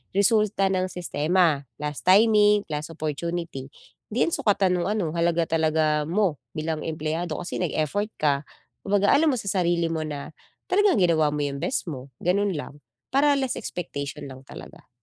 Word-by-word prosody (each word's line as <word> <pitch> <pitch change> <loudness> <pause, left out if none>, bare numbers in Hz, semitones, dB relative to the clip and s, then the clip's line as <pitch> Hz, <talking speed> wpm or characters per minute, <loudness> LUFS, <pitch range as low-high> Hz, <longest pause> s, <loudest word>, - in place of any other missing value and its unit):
resulta 200 -1 +3
ng 185 -1 0
sistema, 165 -4 +1 0.2
last 150 +3 -5
timing, 210 +1 +5
class 150 -3 -4
opportunity, 165 -2 -4 0.4
'di 235 +3 +1
'yan - - 0
sukatan 200 - +2
no'ng 175 - -1
ano 200 -6 -1
halaga 170 -1 +1
talaga 155 -1 +1
mo, 175 -4 0 0.2
bilang 155 0 -2
empleyado 160 +1 -3
kasi 175 - -4
nag-effort 180 +4 -1
ka, 145 -1 0 0.4
kumbaga 200 0 +3
alam 305 +2 +4
mo - - -3
sa 200 -3 -4
sarili 170 -1 +1
mo 160 -1 -2
na 145 -1 -6 0.4
talagang 410 +1 +4
ginawa 165 -3 +3
mo 150 - -1
'yong 140 -1 -3
best 270 - -1
mo, 135 -3 -7
gano'n 195 +2 +1
lang. 145 -1 -7 0.3
Para 285 +2 +4
less 265 -2 -1
expectation 145 - -5
lang 130 0 -11
talaga. - - -12
170 Hz, 160 wpm, -25 LUFS, 155-200 Hz, 0.4 s, timing